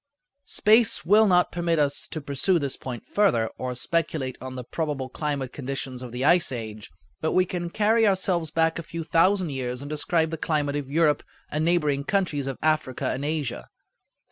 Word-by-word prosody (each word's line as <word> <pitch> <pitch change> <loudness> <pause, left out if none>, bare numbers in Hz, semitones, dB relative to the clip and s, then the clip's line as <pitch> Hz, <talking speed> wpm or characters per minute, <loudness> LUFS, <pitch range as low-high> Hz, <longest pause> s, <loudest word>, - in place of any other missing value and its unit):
Space 220 +1 +3
will 210 +4 +6
not 180 -2 +3
permit 170 -1 0
us 145 -1 +1
to 155 - -5
pursue 145 +6 +1
this 140 -4 -2
point 125 -3 -7
further, 120 - +2
or 125 -1 -3
speculate 150 -2 -1
on 130 0 -6
the 125 - -5
probable 145 -1 -3
climatic 140 -2 -3
conditions 135 -2 -5
of 125 -2 -7
the 125 +3 -2
ice 170 -1 +4
age; 110 -4 -6 0.3
but 160 - 0
we 185 - +4
can 175 -1 -4
carry 220 +4 +3
ourselves 185 -4 +1
back 165 +1 +1
a - - -3
few 165 0 -6
thousand 170 +2 +2
years 125 -2 -3
and 140 +2 -7
describe 160 +2 +1
the 165 - -3
climate 145 -3 0
of 145 -2 -4
Europe 150 -1 +3 0.3
and 155 +1 0
neighboring 150 -5 +1
countries 165 -7 0
of 135 - -3
Africa 155 -5 0
and 135 - -3
Asia. 145 - -3
150 Hz, 185 wpm, -25 LUFS, 135-170 Hz, 0.3 s, will